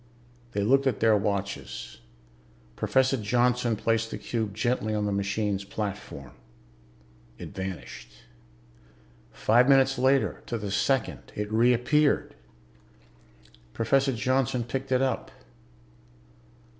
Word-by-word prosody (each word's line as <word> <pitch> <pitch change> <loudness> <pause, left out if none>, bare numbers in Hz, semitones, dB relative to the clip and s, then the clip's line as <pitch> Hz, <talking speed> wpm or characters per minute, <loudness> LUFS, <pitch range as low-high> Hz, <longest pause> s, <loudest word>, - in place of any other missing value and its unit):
They 100 - 0
looked 135 +5 +3
at 125 -6 0
their 110 -1 +4
watches. 100 -12 -3 0.8
Professor 130 0 +2
Johnson 120 +1 +1
placed 115 +1 0
the - - -5
cube 110 -3 -3
gently 110 -1 0
on 105 -1 -1
the 105 - -1
machine's 100 0 -1
platform. 100 - -6 1.1
It - - -8
vanished. 95 -1 -7 1.2
Five 120 +4 +3
minutes 135 -1 +4
later, 135 +1 +2
to 120 - -2
the 105 -2 -5
second, 105 - -1
it 105 0 -4
reappeared. 125 +6 +2 1.4
Professor 135 +4 +2
Johnson 125 0 0
picked 135 +3 -5
it 130 0 +3
up. 135 - -1
115 Hz, 105 wpm, -27 LUFS, 100-130 Hz, 1.4 s, their